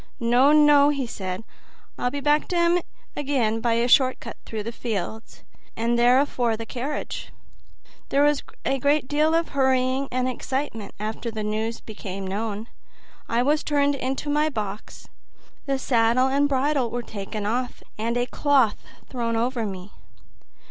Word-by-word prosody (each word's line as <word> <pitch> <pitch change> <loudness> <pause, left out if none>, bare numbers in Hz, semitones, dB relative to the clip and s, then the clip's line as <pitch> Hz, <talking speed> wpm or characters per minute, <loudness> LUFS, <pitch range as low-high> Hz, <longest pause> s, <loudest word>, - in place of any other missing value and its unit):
"No, 245 +4 +4
no," 295 -1 +6
he 280 -3 -1
said; 190 -3 -5 0.5
"I'll 245 - -1
be 285 +2 -4
back 295 +1 +2
to 360 - -3
'em 340 +1 +4 0.4
again 255 -6 0
by 235 0 +2
a 235 +1 +2
short 260 0 +4
cut - - -8
through 220 -2 -4
the 230 - -4
fields, 220 -2 -5 0.3
and 230 +1 0
be 240 - +2
there 245 +2 +5
afore 245 -5 0
the 225 - -6
carriage." 260 +6 -5 0.8
There 280 +1 +3
was 295 -1 +3 0.2
a 270 - +1
great 285 +1 +2
deal 305 +3 +2
of 330 0 +1
hurry 265 0 +1
and 255 0 0
excitement 255 -4 -4
after 220 +2 -4
the 220 -1 -4
news 220 +2 -2
became 195 -3 -7
known. 210 +3 -3 0.6
I 235 +1 +2
was 295 +3 +3
just - - -10
turned 285 -1 +2
into 270 +1 -3
my 300 +1 +2
box; 210 -6 -6 0.6
the 275 -1 +1
saddle 250 0 +2
and 285 +2 +2
bridle 275 -2 +1
were 240 +1 -3
taken 205 -1 -6
off, 245 +4 -2 0.2
and 230 +2 -1
a 245 - +1
cloth 265 -4 +2 0.3
thrown 235 -2 -2
over 235 -1 0
me. 190 0 -7
250 Hz, 165 wpm, -24 LUFS, 225-280 Hz, 0.8 s, no